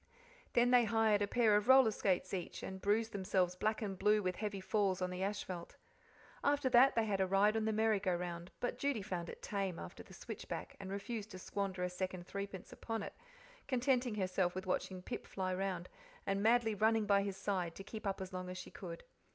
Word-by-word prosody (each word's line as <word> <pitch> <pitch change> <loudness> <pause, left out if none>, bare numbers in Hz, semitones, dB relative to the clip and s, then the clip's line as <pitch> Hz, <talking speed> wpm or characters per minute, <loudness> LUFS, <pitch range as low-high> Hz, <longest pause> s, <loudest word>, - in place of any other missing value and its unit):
Then 245 +1 +4
they 245 -1 +6
hired 220 -1 +3
a 205 - +2
pair 225 -2 +4
of 210 +2 +2
roller 260 -3 +7
skates 195 -3 0
each, 180 -3 -4
and 190 0 -6
bruised 220 +2 +2
themselves 185 -3 +1
black 215 +3 0
and 195 -3 -4
blue 210 +1 +4
with 185 0 -1
heavy 205 -2 -3
falls 195 -1 +1
on 180 0 -1
the 180 0 -4
asphalt. 190 -3 -3 0.7
After 285 -2 +2
that 255 +2 +6
they 230 -1 +3
had 200 -2 0
a 190 - +2
ride 200 +3 +4
on 220 -1 +1
the 220 - +2
merry 220 -1 +2
go 185 -2 +1
round, 175 0 -5
but 245 - -2
Judy 280 -7 0
found 180 -4 -4
it - - -9
tame 195 -4 -2
after 85 - -8
the - - -13
switchback, - - -6
and 190 - -6
refused 200 +2 -4
to 185 - -8
squander 190 0 -3
a 180 - 0
second 185 -1 -4
threepence 200 -1 -6
upon 225 -2 -4
it, - - -6 0.5
contenting 255 -2 +1
herself 185 -2 0
with 185 - -4
watching 185 0 -2
Pip - - -5
fly 185 -1 -2
round, 185 -2 -2 0.4
and 195 0 0
madly 225 0 +4
running 220 +1 +3
by 200 -1 +4
his 195 -1 -3
side, 180 -5 -1
to 195 - -8
keep 215 +1 -6
up 195 -1 -2
as 190 0 -6
long 185 0 -4
as 185 - -5
she - - -8
could. 170 -3 -8
200 Hz, 215 wpm, -36 LUFS, 185-220 Hz, 0.7 s, roller